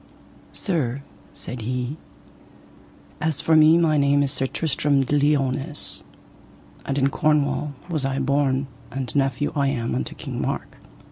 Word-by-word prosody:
Sir, 140 Hz, -, -2 dB, 0.3 s
said 125 Hz, -1 st, -5 dB
he, 125 Hz, +5 st, -3 dB, 1.2 s
as 160 Hz, -3 st, +1 dB
for 160 Hz, -, +3 dB
me 155 Hz, +1 st, +7 dB
my 160 Hz, -3 st, +3 dB
name 140 Hz, 0 st, +3 dB
is 135 Hz, -, 0 dB
Sir 135 Hz, -1 st, 0 dB
Tristram 140 Hz, -2 st, +1 dB
de 145 Hz, -, 0 dB
Liones, 145 Hz, +1 st, +1 dB, 0.9 s
and 135 Hz, -, -1 dB
in 135 Hz, 0 st, +3 dB
Cornwall 150 Hz, -1 st, +1 dB
was 160 Hz, -5 st, -1 dB
I 135 Hz, 0 st, -1 dB
born, 135 Hz, 0 st, +1 dB, 0.2 s
and 130 Hz, -3 st, -5 dB
nephew 135 Hz, 0 st, +1 dB
I 140 Hz, -1 st, +2 dB
am 120 Hz, -, -1 dB
unto 65 Hz, 0 st, -3 dB
King -, -, -5 dB
Mark. -, -, -3 dB
140 Hz, 140 wpm, -23 LUFS, 130-150 Hz, 1.2 s, me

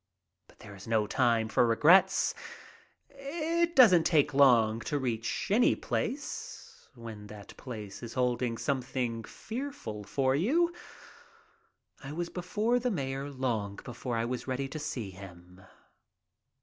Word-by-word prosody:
But -, -, -22 dB
there 105 Hz, -1 st, -12 dB
is 95 Hz, -, -12 dB
little 110 Hz, -2 st, +1 dB
time 115 Hz, -2 st, +2 dB
for 120 Hz, +2 st, +3 dB
regrets. 175 Hz, +11 st, +5 dB, 0.7 s
It 330 Hz, +5 st, -2 dB
doesn't 185 Hz, -11 st, +7 dB
take 145 Hz, -3 st, +3 dB
long 140 Hz, 0 st, +7 dB
HELLO! 125 Hz, -, +7 dB
ENGLAND 110 Hz, 0 st, -1 dB
41 -, -, -2 dB
to 145 Hz, -2 st, 0 dB
reach 115 Hz, -, -2 dB
any 235 Hz, +4 st, +4 dB
place 285 Hz, +5 st, -5 dB
when 110 Hz, -3 st, -9 dB
that 105 Hz, -1 st, -11 dB
place 105 Hz, -6 st, -8 dB
is 115 Hz, -1 st, -8 dB
holding 125 Hz, -2 st, 0 dB
something 125 Hz, -4 st, -2 dB
fearful 220 Hz, -, -6 dB
for 130 Hz, +5 st, 0 dB
you. 320 Hz, -, +2 dB, 1.3 s
I 140 Hz, +2 st, -7 dB
was 170 Hz, +2 st, -3 dB
before 210 Hz, +7 st, 0 dB
the 250 Hz, +1 st, -1 dB
mayor 135 Hz, -, -3 dB
long 120 Hz, -7 st, -2 dB
before 120 Hz, 0 st, -4 dB
I 115 Hz, -, 0 dB
was 125 Hz, +2 st, -4 dB
ready 135 Hz, +1 st, -2 dB
to 155 Hz, -, -6 dB
see 130 Hz, -9 st, -4 dB
him. 90 Hz, -1 st, -13 dB
130 Hz, 145 wpm, -30 LUFS, 115-180 Hz, 1.3 s, doesn't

